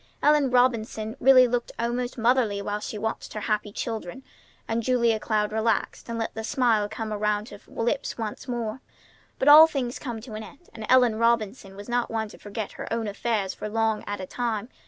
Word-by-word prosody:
Ellen 295 -2 +4
Robinson 230 -3 +1
really 255 -1 +7
looked 240 0 -2
almost 240 +2 -2
motherly 230 -3 +2
while 205 +1 -3
she 210 - -6
watched 220 +2 -4
her 215 - -5
happy 210 -1 -1
children; 225 +2 -5 0.4
and 225 +1 0
Julia 235 -2 +2
Cloud 215 -1 0
relaxed, 220 +1 -1
and 230 - -3
let 225 - -3
the 220 - -5
smile 230 -5 +1
come 220 0 -4
around 210 +1 -1
her 205 - -11
lips 240 +5 -2
once 220 +2 -5
more. 240 0 -3 0.6
But 265 - -1
all 305 +2 +10
things 260 -6 -3
come 240 -5 -5
to 230 -1 -10
an 215 - -5
end, 280 +10 -13
and 220 -1 -7
Ellen 250 -4 +5
Robinson 225 -3 0
was 205 +1 -10
not 240 0 0
one 220 -1 -2
to - - -14
forget 205 0 -5
her - - -8
own 230 -1 -1
affairs 205 -1 -1
for 210 - -6
long 220 0 0
at 205 - -3
a 185 - -5
time. 230 +1 -3
225 Hz, 200 wpm, -26 LUFS, 215-245 Hz, 0.6 s, all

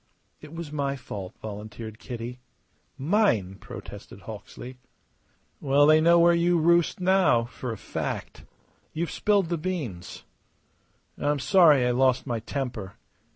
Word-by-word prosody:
"It - - -12
was 165 -2 -7
my 140 -2 -1
fault," 105 -7 -8
volunteered 110 +1 -8
Kitty. 120 0 -7 0.6
"Mine," 140 - +1
protested - - -10
Hawksley. 125 +1 -10 0.8
"Well, 140 +1 +4
they 155 +1 +6
know 170 +1 +5
where 170 0 +6
you 170 +1 +2
roost 170 +2 +3
now, 185 -10 +3
for 125 0 -6
a 110 - -5
fact. - - -5 0.5
You've 165 0 -2
spilled 200 -5 +1
the 170 -2 -1
beans. 150 - -5 1.0
I'm 145 0 +1
sorry 150 -4 +5
I 125 - +2
lost 130 +1 +2
my 120 -4 -2
temper. 120 -5 -5
140 Hz, 130 wpm, -26 LUFS, 120-170 Hz, 1.0 s, they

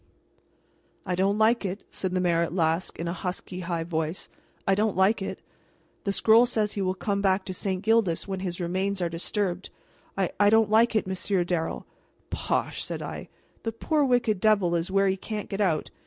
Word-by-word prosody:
"I 180 - -1
don't 195 +3 +1
like 220 +2 +3
it," 195 +1 -4
said 185 -1 -3
the 185 - +1
mayor 170 -2 +2
at 170 +1 -2
last, 165 0 0
in 170 - -4
a 170 - -1
husky, 180 0 -5
high 170 -2 -2
voice. 160 0 -3 0.4
"I 195 - +4
don't 210 -1 +1
like 195 +3 +3
it! 195 - -5 0.6
The 200 - +1
scroll 225 +4 +5
says 215 -3 0
he 200 - -2
will 185 -1 0
come 200 +1 -1
back 190 -1 +2
to 185 - -4
St. 190 0 -2
Gildas 220 -7 +2
when 190 -1 -3
his 180 -1 -4
remains 190 +3 -1
are 175 -2 0
disturbed. 180 +2 -2 0.5
I 190 -2 0
I 205 0 +6
don't 220 -1 +4
like 225 +1 +4
it, 215 - +2
Monsieur 190 0 0
Darrel 170 -2 -2 0.3
" - - -39
"Bosh!" - - -1
said - - -5
I; - - -7 0.3
"the 225 - -2
poor 295 +7 0
wicked 245 -6 +2
devil 200 -4 +3
is 170 +1 0
where 195 +1 +3
he 190 0 +1
can't 210 +1 -5
get 200 +1 -2
out. 165 -6 0
190 Hz, 200 wpm, -26 LUFS, 180-210 Hz, 0.6 s, I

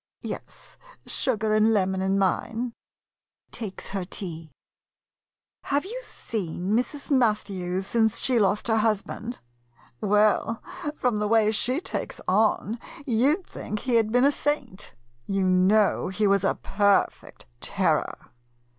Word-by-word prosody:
Yes, - - -8 0.3
sugar 220 -4 0
and 215 +1 +4
lemon 190 -1 +1
in 190 +1 +1
mine. 225 +5 0 0.8
[Takes 215 -5 -6
her 195 -1 -3
tea."] 165 -3 -6 1.2
Have 285 +4 0
you 470 +6 -5
seen 190 - -4
Mrs. 255 +6 -1
Mathews 195 -7 +1
since 225 +1 +2
she 250 -3 +2
lost 205 +1 +1
her 225 -1 +3
husband? 220 +2 -1 0.6
Well, 210 +2 +2 0.4
from 245 -7 0
the 210 - 0
way 215 -1 +4
she 250 +6 0
takes - - -4
on, 215 +3 +2 0.3
you 260 +6 +3
'd - - -31
think 210 0 -6
he 245 -2 +2
had 220 -1 +1
been 245 +2 +4
a 285 - +5
saint. 280 -9 -3 0.3
You 195 -1 0
know 190 +3 +3
he 200 +3 0
was 200 -1 +3
a 195 - +2
perfect 200 0 0
terror. - - -1
215 Hz, 130 wpm, -26 LUFS, 195-235 Hz, 1.2 s, a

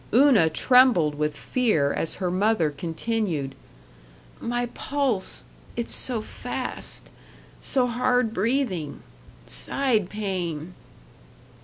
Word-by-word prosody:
Una 250 - +6
trembled 235 - +5
with 150 0 -2
fear 210 - +1
as 165 - -2
her 185 -2 -2
mother 185 -4 +2
continued, 165 -1 -2 0.9
"My 240 +1 -1
pulse 270 -9 -1 0.3
it's 235 -1 -2
so 235 -4 +1
fast - - -4 0.5
so 260 -2 +1
hard 245 -1 +1
breathing 200 - -1 0.4
side 235 -9 0
pain." 180 -5 -3
210 Hz, 95 wpm, -25 LUFS, 165-245 Hz, 0.9 s, Una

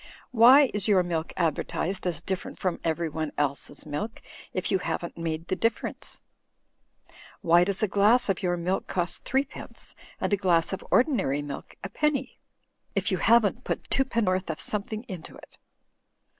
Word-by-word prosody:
Why 255 +4 +7
is 205 0 -1
your 195 -4 +4
milk 165 -2 -2
advertised 180 +2 -1
as 170 -2 -2
different 190 0 -4
from 185 -2 -2
everyone 160 -2 -2
else's 145 0 0
milk, 155 +10 -4 0.3
if 185 - -2
you 190 - +3
haven't 175 -1 -4
made 165 -1 -3
the 185 - 0
difference? 230 +3 -3 1.2
Why 175 -2 +5
does 195 +2 -1
a - - +4
glass 210 +5 +4
of 195 -2 0
your 175 -2 0
milk 180 +3 -2
cost 175 -1 -2
threepence, 270 +2 -3 0.3
and - - -1
a - - +4
glass 175 -3 +2
of 190 - -4
ordinary 195 - +2
milk, 145 -1 -8
a - - -4
penny, 280 -4 -1 0.6
if - - 0
you - - +1
haven't 235 +1 +3
put - - -4
twopennorth 210 -9 +1
of 160 - -3
something 215 +1 -3
into 185 -7 -8
it - - -16
185 Hz, 155 wpm, -27 LUFS, 170-220 Hz, 1.2 s, Why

